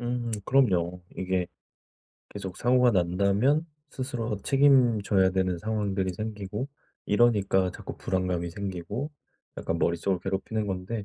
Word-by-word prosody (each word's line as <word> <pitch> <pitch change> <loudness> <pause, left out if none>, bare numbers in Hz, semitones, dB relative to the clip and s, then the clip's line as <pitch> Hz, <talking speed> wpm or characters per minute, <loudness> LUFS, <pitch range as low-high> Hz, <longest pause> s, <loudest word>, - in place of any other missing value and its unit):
음 120 -1 -2
그럼요. 90 -10 +2 0.2
이게 95 -1 -1 0.8
계속 95 -3 -7
사고가 125 0 +4
난다면 100 - +2 0.2
스스로 120 -5 -3
책임져야 120 -9 +4
되는 95 -2 0
상황들이 100 -3 -1
생기고 105 +4 -4 0.4
이러니까 100 -4 +3
자꾸 - - -8
불안감이 90 -2 -1
생기고 100 - -4 0.5
약간 85 - -2
머릿속을 90 +2 +1
괴롭히는 100 +3 -2
건데 95 +3 -3
100 Hz, 300 characters per minute, -27 LUFS, 95-120 Hz, 0.8 s, 사고가